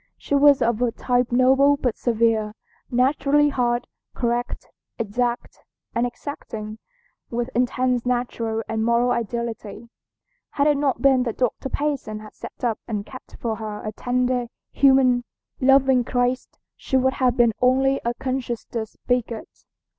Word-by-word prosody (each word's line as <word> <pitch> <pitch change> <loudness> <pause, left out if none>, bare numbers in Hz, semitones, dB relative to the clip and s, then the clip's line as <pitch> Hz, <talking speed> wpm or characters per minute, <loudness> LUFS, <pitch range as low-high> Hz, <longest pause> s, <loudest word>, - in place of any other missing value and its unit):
She - - -5
was 285 0 +6
of 235 0 0
a 245 -2 +2
type 245 +1 0
noble 265 +3 +4
but 250 -5 -1
severe, 225 -2 +1 0.3
naturally 280 +3 +3
hard, 245 -3 0 0.3
correct, 240 0 -2 0.3
exact 240 +2 -2 0.3
and 235 +1 +1
exacting, 220 -4 -7 0.5
with 240 +2 -3
intense 250 0 +1
natural 240 -2 -1
and 220 0 -1
moral 235 +2 +2
ideality. 235 -1 -4 0.6
Had 280 - +1
it 295 -1 +3
not 275 -4 0
been 265 -2 +5
that 235 -3 -3
Doctor 255 +1 -1
Payson 275 -7 -2
had 215 0 -12
set - - -11
up 230 -3 0
and 210 -3 -3
kept 255 - -12
before 225 -2 -3
her 215 -2 -6
a 215 - -2
tender, 250 +2 -1 0.2
human, 265 -3 +4 0.4
loving 265 -1 +4
Christ, 245 +1 -1 0.2
she 265 - -1
would 260 0 +2
have 250 -1 +3
been 235 -2 +4
only 270 +2 +3
a 235 +1 -1
conscientious 240 -4 -4
bigot. 240 -3 -3
245 Hz, 140 wpm, -23 LUFS, 230-260 Hz, 0.6 s, was